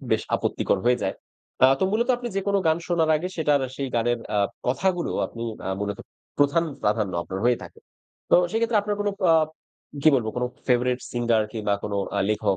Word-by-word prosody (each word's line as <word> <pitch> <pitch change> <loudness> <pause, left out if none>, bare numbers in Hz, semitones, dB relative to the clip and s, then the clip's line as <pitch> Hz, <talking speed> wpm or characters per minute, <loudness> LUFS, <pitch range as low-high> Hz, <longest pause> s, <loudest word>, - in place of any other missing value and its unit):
খুব - - -10
বেশ - - -2
আপত্তিকর 100 - 0
হয়ে 125 0 +3
যায়। 95 - -1 0.5
আ - - +11
তো - - +3
মূলত 235 +3 +1
আপনি 240 0 -5
যেকোনো 200 0 +1
গান 160 +1 +3
শোনার 165 -3 +2
আগে 180 +4 -3
সেটার 150 -3 +2 0.2
সেই 135 -1 -3
গানের 120 +1 +1 0.2
আ - - +2 0.3
কথাগুলো 175 +8 0 0.2
আপনি 115 - -8 0.2
আ - - -2
মূলত 100 -1 -3 0.4
প্রধান 145 +4 +3 0.2
প্রাধান্য 105 -2 +1
আপনার 95 +2 -5
হয়ে 120 -1 +4
থাকে। - - -12 0.5
তো - - +7
সেক্ষেত্রে 225 0 +1
আপনার 205 0 -2
কোনো 205 0 +1 0.2
আ - - +7 0.7
কি 155 - +7
বলব 120 -4 +1
কোনো 125 0 0 0.2
ফেভারাইট 125 0 +2
সিঙ্গার 120 -2 +2
কিংবা 105 -3 0
কোনো 100 -1 -2 0.2
আ - - +2
লেখক 105 -2 +1
125 Hz, 190 wpm, -24 LUFS, 110-175 Hz, 0.7 s, আ